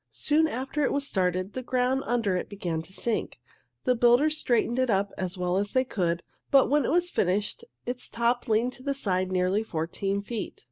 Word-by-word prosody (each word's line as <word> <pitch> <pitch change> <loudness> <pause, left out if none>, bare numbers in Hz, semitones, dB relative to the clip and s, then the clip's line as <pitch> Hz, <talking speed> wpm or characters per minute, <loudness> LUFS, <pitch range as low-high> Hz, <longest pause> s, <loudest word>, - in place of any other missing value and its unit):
Soon 315 +2 +2
after 270 +2 -2
it - - +2
was 280 0 -1
started, 185 -1 0
the 255 - -3
ground 255 +1 +1
under 230 -6 +1
it 180 - -3
began 175 -5 -3
to 165 - -12
sink. 225 - -2 0.4
The 250 - +3
builders 245 +6 +4
straightened 240 -3 +1
it 255 -1 +2
up 200 -1 +1
as 185 0 -3
well 180 0 0
as 205 +1 -1
they 255 - +4
could, 170 -7 -1 0.3
but 275 -1 +5
when 295 -3 +3
it - - 0
was 350 +2 +2
finished 205 - 0 0.2
its 250 +1 -4
top 235 +2 0
leaned 230 +3 +2
to 255 - -13
one 280 0 -1
side 185 -7 0
nearly 185 +3 +2
fourteen 195 +1 -2
feet. 225 0 -5
230 Hz, 200 wpm, -27 LUFS, 190-255 Hz, 0.4 s, but